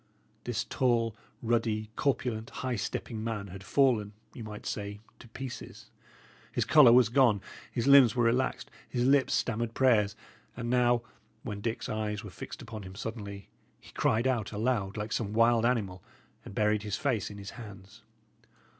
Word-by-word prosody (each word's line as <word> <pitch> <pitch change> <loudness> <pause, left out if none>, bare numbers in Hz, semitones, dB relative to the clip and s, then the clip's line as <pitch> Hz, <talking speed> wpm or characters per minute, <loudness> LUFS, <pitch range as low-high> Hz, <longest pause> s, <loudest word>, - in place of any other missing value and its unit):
This - - -1
tall, 115 -4 +1 0.3
ruddy, 110 -2 0
corpulent, 120 -5 -1 0.2
high 125 -1 0
stepping 110 +1 -4
man 110 -3 -3
had 95 +2 -9
fallen, 115 -5 +2 0.2
you 120 - -8
might 105 -1 -8
say, 105 0 -4 0.2
to - - -13
pieces; 125 +2 -8 0.6
his - - 0
colour 150 -6 +7
was 120 -2 +6
gone, 120 -4 +4 0.3
his 120 - -2
limbs 135 -4 +7
were 120 - +2
relaxed, 125 +3 0 0.2
his 120 -1 0
lips 135 0 +4
stammered 115 -1 -1
prayers; 110 -6 +3 0.4
and 120 -1 -3
now, 120 -1 +3 0.4
when 105 -4 -5
Dick's 115 +1 -3
eyes 105 0 -3
were 105 - -8
fixed - - -8
upon 110 -1 -7
him 95 -1 -10
suddenly, 100 -2 -6 0.3
he - - -16
cried 115 +3 +1
out 120 -6 0
aloud, 105 -2 -1
like 105 +1 -4
some 105 -3 -2
wild 115 +1 +4
animal, 100 -7 -1 0.4
and 100 - -10
buried 105 0 +2
his 105 -2 -3
face 125 -8 -1
in 100 - -9
his 100 -1 -8
hands. 100 -5 -12
115 Hz, 165 wpm, -30 LUFS, 105-120 Hz, 0.6 s, colour